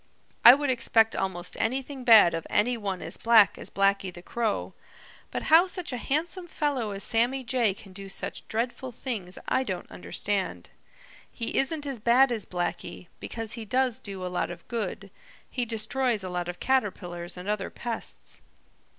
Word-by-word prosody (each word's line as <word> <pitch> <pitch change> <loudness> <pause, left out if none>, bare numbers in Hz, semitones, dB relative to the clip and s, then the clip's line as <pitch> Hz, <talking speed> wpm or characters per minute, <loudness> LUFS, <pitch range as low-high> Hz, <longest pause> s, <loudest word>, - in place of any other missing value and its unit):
I 240 - +11
would 285 -1 0
expect 225 -2 +3
almost 180 -2 -3
anything 265 +3 -2
bad 220 -8 +8
of 165 -1 -4
any 245 +4 +2
one 200 -5 -4
as - - -2
black 225 -3 +5
as - - -5
Blacky 195 -1 +1
the 175 0 -12
Crow. 225 -1 -2 0.6
But - - -4
how 330 +4 +6
such 360 -6 -3
a - - -2
handsome 335 +8 -2
fellow 285 -9 -1
as 200 -1 -4
Sammy 245 +4 +1
Jay 235 -5 +1
can 195 -2 -14
do 195 +1 -9
such - - -3
dreadful 245 +3 -2
things 220 -7 -5
I 260 - +2
don't 190 -8 -5
understand. 135 - -3 0.6
He 230 - -4
isn't 295 +2 +1
as 270 -4 -3
bad 245 +4 +5
as 225 -4 -3
Blacky, 175 0 -4
because 225 -2 -5
he 230 - -5
does 250 +2 0
do 195 -3 -5
a - - -2
lot 180 0 -2
of 175 0 -10
good. 205 -4 -4 0.4
He 245 -2 -2
destroys 230 0 0
a 185 - -4
lot 175 -1 -3
of 175 - -6
caterpillars 180 -9 -1
and 180 +2 -8
other 210 -2 -1
pests. 235 -1 -4
225 Hz, 175 wpm, -27 LUFS, 190-255 Hz, 0.6 s, I